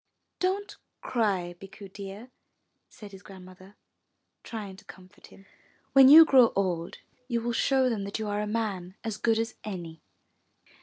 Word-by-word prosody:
Don't 390 +3 -2 0.2
cry, 195 -7 -1
Bikku 200 +1 -12
dear," 200 +5 -9 0.6
said 210 -2 -13
his 195 -1 -13
Grandmother, 185 0 -14 0.7
trying 210 -4 -7
to - - -17
comfort 190 +1 -16
him. 195 - -18 0.5
When 270 -1 +8
you 320 +3 +10
grow 255 -6 +5
old, 180 -3 -2 0.3
you 235 -3 -1
will 235 +1 -3
show 265 +2 +2
them 225 -5 -2
that 200 - -4
you 220 -1 -4
are 205 0 -2
a 210 - -3
man 200 -5 -4
as 220 -3 -4
good 225 +1 +1
as 225 +1 -2
any." 170 -6 -7
205 Hz, 155 wpm, -27 LUFS, 190-230 Hz, 0.7 s, you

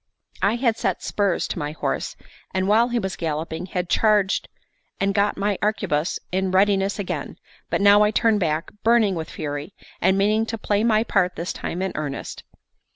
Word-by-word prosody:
I 205 +3 +3
had 235 -2 +1
set - - -1
spurs 200 -4 0
to - - -3
my 150 0 -3
horse, - - -3 0.4
and 190 0 +1
while 220 +4 +4
he 240 - 0
was 190 -5 -2
galloping, 160 +2 -3
had 180 -1 -3
charged 205 +1 +2 0.5
and 195 0 +1
got 205 +1 +1
my 200 -1 0
arquebuse 190 -7 0
in 190 +1 0
readiness 195 +1 +2
again; 200 -3 -4 0.3
but - - 0
now 205 +1 +7
I 210 - +5
turned 220 0 +2
back, 160 -3 -1
burning 225 -3 +4
with 160 -2 -4
fury, 145 +4 -5 0.3
and 190 +2 +3
meaning 215 +3 +2
to 225 - -3
play 210 0 0
my 220 -1 +3
part 190 -5 +1
this 170 +2 -3
time 180 +2 -4
in 190 - -1
earnest. 145 -2 -5
195 Hz, 180 wpm, -23 LUFS, 175-210 Hz, 0.5 s, now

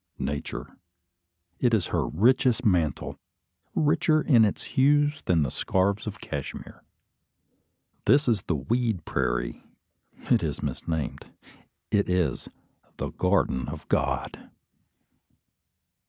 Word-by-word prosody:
Nature. 70 +2 -5 0.8
It 120 -3 +3
is 100 -6 -1
her - - +1
richest 125 - +2
mantle, 85 -8 0 0.6
richer 155 +1 +3
in 120 -7 +5
its 105 - -2
hues 145 +2 +3
than 85 -4 +3
the 65 - -2
scarfs 100 +3 0
of 105 0 -5
Cashmere. 70 -7 -7 1.2
This 140 +6 +4
is 110 -5 +2
the 85 - +1
"weed 110 - -1
prairie." - - -2 0.7
It - - +5
is - - -3
misnamed. 80 -3 -3 0.6
It 100 -2 +2
is 90 -2 0 0.5
"the - - -3
garden 90 -9 +1
of - - -8
God." - - -1
100 Hz, 110 wpm, -26 LUFS, 80-125 Hz, 1.2 s, in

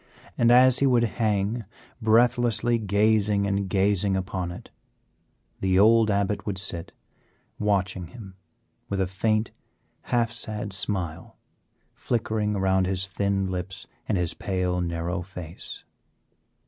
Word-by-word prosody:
And 120 - +3
as 125 +1 +6
he 140 - +3
would 120 -2 +3 0.2
hang 105 +2 0 0.4
breathlessly 120 +1 +3
gazing 105 0 +2
and 100 -1 -1
gazing 100 0 +2
upon 95 -2 -3
it, 90 - -11 0.9
the 95 -1 +1
old 110 +2 +5
Abbot 100 0 0
would 100 -2 -3
sit 85 -2 -3 0.7
watching 95 -3 0
him 95 0 -11 0.6
with 100 - -2
a 95 - +2
faint, 110 +4 0 0.6
half 120 -2 +1
sad 105 -4 -2
smile 90 -4 -3 0.6
flickering 110 -3 -1
around 95 -1 +2
his 95 0 +1
thin 100 +1 -1
lips 95 0 -4 0.2
and 105 - +2
his 90 -2 -1
pale, 90 -2 -1
narrow 85 +1 -2
face. 90 -2 -9
100 Hz, 120 wpm, -25 LUFS, 95-110 Hz, 0.9 s, as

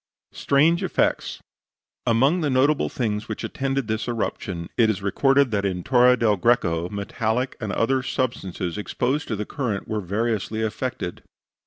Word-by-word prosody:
STRANGE 160 +5 +2
EFFECTS 190 - 0 0.7
Among 135 +10 +3
the 150 - +1
notable 135 +3 +2
things 110 -2 -2
which - - -4
attended 135 -2 -2
this 110 +1 -2
eruption, 95 -7 -3
it 115 -2 +4
is 100 -2 -2
recorded 135 +5 +3
that 100 -2 0
in 90 -3 -2
Torre 125 +2 +5
del 110 -4 +2
Greco 90 -6 +2
metallic 110 +5 -2
and 105 -3 -2
other 130 +5 +1
substances 105 -9 -3
exposed 130 +7 -1
to 110 - -2
the 105 +1 -3
current 110 -7 -3
were 110 -1 -2
variously 110 +2 -1
affected. 110 -5 -3
115 Hz, 150 wpm, -24 LUFS, 100-130 Hz, 0.7 s, Torre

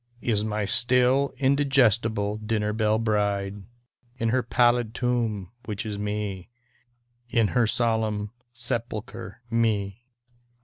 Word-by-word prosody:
Is 110 -4 0
n^y 105 -1 -2
still 125 +4 +4
indigestible 120 -7 +2
dinner 105 -1 -1
belle 110 0 +1
bride, 105 -2 -1 0.6
In 115 -1 0
her 130 +3 +2
pallid 120 -1 +2
tomb, 115 -6 -1
which 105 0 -4
is 105 -2 -4
Me, 105 -3 -4 0.8
In 115 -3 +2
her 120 -3 +2
solemn 110 -3 0 0.2
sepulcher, 120 -1 -5
Me. 110 -1 -1
110 Hz, 105 wpm, -25 LUFS, 105-120 Hz, 0.8 s, still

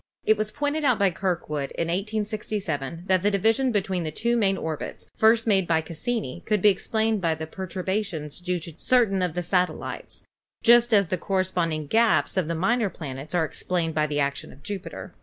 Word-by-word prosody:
It 220 - +5
was 215 0 -1
pointed 290 +5 -2
out 255 -5 +3
by 200 -3 +3
Kirkwood 165 -6 -2
in 165 - -2
1867 195 -6 -3
tnat 185 -1 +3
tne 205 - +3
division 225 +6 +2
between 190 -4 0
the 160 - -2
two 235 +10 0
main 195 -4 +2
orbits, 160 -2 -5
first 225 +1 +4
made 195 -5 +2
by 160 -1 +2
Cassini, 170 - -4
could 210 -1 +2
be 210 - +6
explained 220 +2 0
by 165 -2 +1
the 160 0 -5
perturba 190 +4 -3
tions 155 -6 -6
due 180 0 -1
to 165 -2 -9
certain 225 -5 +2
of 180 -3 -1
the 180 - -1
satellites, 180 +1 -2 0.4
just 240 +1 +6
as 200 -5 +4
the 185 - -1
corre 190 +1 +1
sponding 165 -4 -1
gaps 225 +5 +3
of 185 -5 +1
the 170 - -1
minor 210 +5 +1
planets 150 -1 -7
are 165 -2 +3
explained 165 +1 -2
by 155 0 +1
the 145 0 -1
action 140 0 -2
of 140 - -17
Jupiter. 200 +1 -6
185 Hz, 195 wpm, -25 LUFS, 165-215 Hz, 0.4 s, be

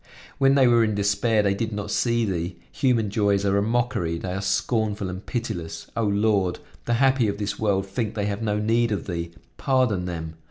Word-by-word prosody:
When 135 0 +5
they 135 -2 +5
were 120 -1 +5
in 110 -2 0
despair 100 +2 +2
they 100 -1 +2
did 110 +3 -3
not 105 0 -4
see 115 0 +1
Thee! 90 -2 -3 0.2
Human 120 -7 +1
joys 100 -1 +1
are 100 0 +2
a - - +1
mockery; 110 -7 0
they 90 +2 -4
are 95 - -3
scornful 105 0 0
and 95 +2 -6
pitiless; 85 -9 -5
O 115 - 0
Lord! 100 -3 +1 0.3
the 120 - +1
happy 130 -1 +3
of 100 0 -2
this 100 -1 -3
world 100 -3 +1
think 105 +2 -3
they 105 -2 -1
have 100 +1 -3
no 105 -2 0
need 115 +2 +1
of 100 - -2
Thee! 85 -2 -4 0.3
Pardon 125 -9 +1
them. 80 -2 -5
105 Hz, 205 wpm, -24 LUFS, 95-115 Hz, 0.3 s, When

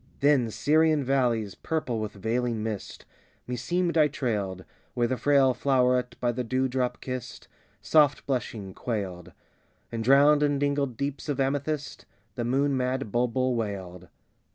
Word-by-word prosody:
Then 140 -5 +3
Syrian 155 +4 +2
valleys, 120 -6 +1
purple 150 -8 -3
with 110 -1 -4
veiling 115 +2 -1
mist, 110 -3 -5 0.4
Meseemed 170 +8 -1
I 150 - +6
trailed, 100 - -3 0.3
Where 120 -1 +2
the 130 - -1
frail 135 +1 +3
floweret, 125 -1 +1
by 120 -1 +1
the 125 +1 -3
dewdrop 130 +1 -1
kissed, 130 -1 -6 0.4
Soft 145 -3 +3
blushing, 115 -7 -3
quailed; 95 -8 -4 0.6
And 115 -1 -3
drowned 140 +4 +5
in 145 -1 +2
dingled 140 -3 -1
deeps 140 +2 -4
of 140 -2 -1
amethyst 145 +2 -2 0.3
The 120 - -3
moon 135 +4 +1
mad 130 -2 -1
bulbul 125 +2 +1
wailed. 95 -6 -4
125 Hz, 135 wpm, -27 LUFS, 115-140 Hz, 0.6 s, I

